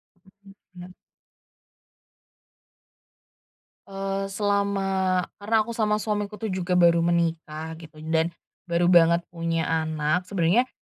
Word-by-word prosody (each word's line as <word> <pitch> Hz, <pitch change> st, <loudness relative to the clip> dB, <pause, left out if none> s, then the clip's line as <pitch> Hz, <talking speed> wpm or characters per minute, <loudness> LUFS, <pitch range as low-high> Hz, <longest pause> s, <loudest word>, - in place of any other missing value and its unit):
Betul 185 Hz, +2 st, -25 dB, 0.5 s
Kak. 180 Hz, +1 st, -11 dB, 2.9 s
Eee 195 Hz, 0 st, -3 dB
selama 195 Hz, -2 st, 0 dB, 0.2 s
karena 210 Hz, +2 st, -1 dB
aku 235 Hz, -, -7 dB
sama 215 Hz, -2 st, +1 dB
suamiku 210 Hz, -1 st, -2 dB
tuh 210 Hz, 0 st, -4 dB
juga 185 Hz, -1 st, -1 dB
baru 170 Hz, -1 st, +5 dB
menikah 165 Hz, -2 st, -1 dB
gitu 155 Hz, -2 st, -13 dB
dan 160 Hz, 0 st, +2 dB, 0.4 s
baru 175 Hz, +1 st, +2 dB
banget 170 Hz, 0 st, +5 dB
punya 165 Hz, -1 st, -1 dB
anak. 160 Hz, +2 st, -1 dB
Sebenernya 195 Hz, +6 st, +2 dB
180 Hz, 105 wpm, -25 LUFS, 165-200 Hz, 2.9 s, baru